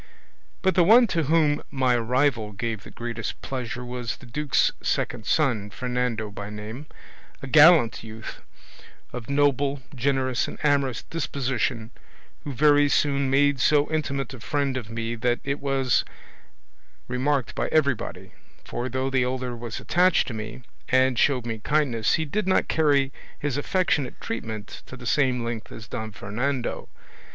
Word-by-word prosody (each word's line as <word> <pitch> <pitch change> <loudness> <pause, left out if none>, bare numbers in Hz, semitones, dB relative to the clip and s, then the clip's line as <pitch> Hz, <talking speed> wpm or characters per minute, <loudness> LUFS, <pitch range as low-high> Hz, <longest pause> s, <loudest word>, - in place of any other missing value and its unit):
But 190 -1 +3
the 180 - +5
one 230 +7 +7
to 165 -2 +1
whom 150 -1 +3
my 130 -2 +1
arrival 120 -2 +1
gave 110 +1 -3
the - - -12
greatest 115 -2 -5
pleasure 125 -2 -4
was 125 -2 -4
the - - -14
duke's 140 +2 +1
second 115 -2 -2
son, 120 -10 +1
Fernando 125 -1 -2
by 100 0 -7
name, 110 +7 -8 0.6
a - - -3
gallant 155 - +6
youth, 110 0 -9 0.7
of 120 -1 -7
noble, 140 -1 +1
generous, 130 -1 0
and - - -7
amorous 140 -5 +1
disposition, 130 -6 -2 0.5
who 145 - -5
very 145 +2 +4
soon 140 -1 +2
made 140 0 +3
so 145 +3 +3
intimate 140 -4 -2
a 130 - -9
friend 140 +3 -1
of 120 -5 -5
me 115 0 -3
that 120 +1 0
it 140 +1 -2
was 135 -2 +1 1.0
remarked 130 +1 0
by - - -1
everybody; 140 -7 0 0.3
for 120 +2 -4
though 130 +1 -2
the 130 -1 +2
elder 125 0 -2
was 120 -1 -6
attached 180 0 +3
to - - -5
me, 110 +3 -7 0.3
and 130 -1 +3
showed 130 -5 +2
me 115 -2 -4
kindness, 120 -5 +1
he 160 - -1
did 205 +7 -2
not 190 - +3
carry 140 -4 +2 0.2
his 145 -3 -2
affectionate 145 -3 0
treatment 110 -2 -6
to 130 - -9
the 125 - -11
same 125 -1 +2
length 115 -1 -5
as 105 -3 -9
Don 110 +2 -5
Fernando. 120 +7 -3
130 Hz, 155 wpm, -25 LUFS, 115-145 Hz, 1.0 s, one